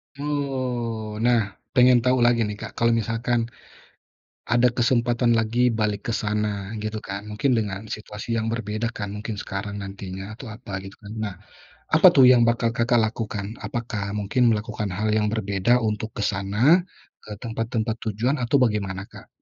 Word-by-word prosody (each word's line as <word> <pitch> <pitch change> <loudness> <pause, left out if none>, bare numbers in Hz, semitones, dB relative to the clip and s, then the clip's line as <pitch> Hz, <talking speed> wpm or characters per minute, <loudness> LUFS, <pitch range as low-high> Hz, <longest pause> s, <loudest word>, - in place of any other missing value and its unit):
Oh 125 -7 -3
nah 115 -5 +1 0.2
pengen 125 0 +6
tahu 125 +2 +2
lagi 120 -1 +4
nih, 105 0 -5
Kak, 110 - -6
kalau 115 0 +3
misalkan. 115 +2 0 1.1
Ada 120 +2 +4
kesempatan 120 0 +2
lagi 115 +2 +2
balik 105 -2 0
ke 115 - -1
sana 105 -2 -1
gitu 110 0 -4
kan 100 +1 -6
mungkin 115 +4 0
dengan 100 -2 -2
situasi 110 +2 -4
yang 110 - -1
berbeda 115 +1 -3
kan 105 -2 -4
mungkin 105 +1 -5
sekarang 100 +1 -5
nantinya 95 +2 -7
atau 135 - -9
apa 105 -5 -6
gitu 95 - -9
kan 105 0 -10
nah, 105 -3 -3 0.6
apa - - +7
tuh 130 -2 +7
yang 120 -2 +6
bakal 115 0 +2
Kakak 120 0 +3
lakukan? 110 -1 -3
Apakah 110 -4 -3
mungkin 110 +4 +2
melakukan 105 -2 -3
hal 105 +3 -1
yang 105 0 +1
berbeda 105 +3 +2
untuk 110 0 -2
ke - - -6
sana, 105 - +3 0.5
ke 105 - -12
tempat-tempat 115 -1 -2
tujuan 115 +7 0
atau 130 +1 +2
bagaimana, 100 -4 0
Kak? - - -13
110 Hz, 160 wpm, -24 LUFS, 105-120 Hz, 1.1 s, apa